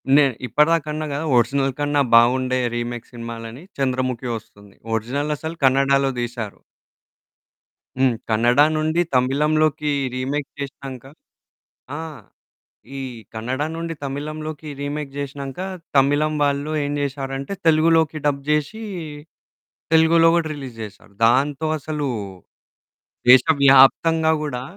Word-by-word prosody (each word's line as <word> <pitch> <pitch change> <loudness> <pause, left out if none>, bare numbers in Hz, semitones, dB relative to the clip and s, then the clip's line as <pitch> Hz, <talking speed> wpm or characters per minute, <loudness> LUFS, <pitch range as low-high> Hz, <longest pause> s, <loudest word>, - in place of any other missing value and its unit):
నే 145 0 +7 0.2
ఇప్పటిదాకన్నా 155 +3 +1
గదా 145 +3 -3
ఒరిజినల్ 135 +3 +1
కన్నా 145 0 +1
బావుండే 130 +2 +4 0.2
రీమేక్ 120 0 -4
సినిమాలని. 115 +2 -8
'చంద్రముఖి' 130 -2 -1
వస్తుంది. 100 -2 -16 0.2
ఒరిజినలసలు 145 +7 -3
కన్నడాలో 135 +1 +3
దీశారు. 115 -3 -5 1.4
హ్మ్. 130 -3 +3
కన్నడా 120 +6 +4
నుండి 155 +2 +1
తమిళంలోకి 150 +3 +2 0.2
రీమేక్ 135 +3 -2
చేషినాంక 135 -2 -7 0.9
ఆ! - - -5 1.0
ఈ - - -4 0.3
కన్నడా 125 +6 -2
నుండి 165 0 -4
తమిళంలోకి 155 +2 -5
రీమేక్ 145 0 -4
జేషినాంక, 140 0 -6 0.4
తమిళం 145 +3 +3
వాళ్ళు 145 +1 0
ఏం 145 - -2
జేషారంటే, 135 +2 -4
తెలుగులోకి 160 -1 +3
డబ్ 140 -1 +1
జేషీ, 150 +9 -1 1.1
తెలుగులో 165 +1 +5
గూడా 165 -2 +1
రిలీజ్ 130 -5 -9
జేశారు. 100 -1 -11
దాంతో 140 +6 +2
అసలూ 150 -1 -3 1.2
దేశవ్యాప్తంగా 140 +4 +6
గూడా 125 -5 -4
140 Hz, 100 wpm, -21 LUFS, 130-150 Hz, 1.4 s, నే